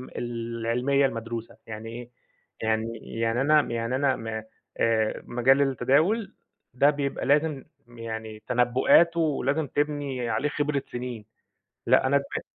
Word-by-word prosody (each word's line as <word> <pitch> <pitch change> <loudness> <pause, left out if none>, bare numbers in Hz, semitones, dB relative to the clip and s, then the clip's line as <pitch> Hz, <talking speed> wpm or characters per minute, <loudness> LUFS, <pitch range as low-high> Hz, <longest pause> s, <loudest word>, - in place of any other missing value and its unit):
العلمية 120 +3 0
المدروسة. 115 -2 -4
يعني 110 0 -7
إيه؟ 120 +1 -8 0.5
يعني 110 +1 -1 0.2
يعني 115 +2 +1
أنا 150 +2 +5
يعني 115 -1 -2
أنا 135 0 +2
ما 110 -1 -5 0.3
آآ 110 -1 +1
مجال 130 +3 +3
التداول 155 - +2 0.4
ده 140 +4 +4
بيبقى 140 -3 -2
لازم 145 0 +2 0.2
يعني 110 -2 -7
تنبؤات، 130 +7 +4
ولازم 150 -1 0
تبني 145 -4 -2
عليه 135 +7 0
خبرة 145 -1 -1
سنين، 120 -3 -5 0.6
لأ - - +4
أنا 140 +1 +4
دما 140 - -4
125 Hz, 125 wpm, -26 LUFS, 115-140 Hz, 0.6 s, أنا